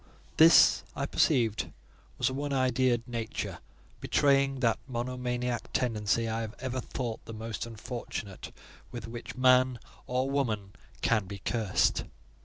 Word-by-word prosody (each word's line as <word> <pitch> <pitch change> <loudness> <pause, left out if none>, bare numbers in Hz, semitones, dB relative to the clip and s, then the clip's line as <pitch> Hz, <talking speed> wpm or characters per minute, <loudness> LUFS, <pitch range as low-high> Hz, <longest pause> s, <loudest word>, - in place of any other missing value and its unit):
This, 160 +1 +7
I - - -1
perceived, 110 -8 +2 0.5
was - - +1
a 130 - -1
one 140 +1 -2
idea'd 130 -2 +2
nature; 115 -2 -4 0.4
betraying 135 -1 +2
that 115 -3 +2
monomaniac 125 -1 -3
tendency 115 -1 +1
I 110 +1 -1
have 110 0 -6
ever 130 0 -3
thought 120 -3 -5
the 115 - -8
most 115 +1 -5
unfortunate 110 -4 -6 0.4
with 120 -2 -7
which 115 +1 -7
man 130 -1 +4 0.3
or 130 +1 0
woman 110 -8 -1 0.3
can 110 -3 +2
be 100 +1 -6
cursed. 105 -1 +1
120 Hz, 130 wpm, -29 LUFS, 115-130 Hz, 0.5 s, This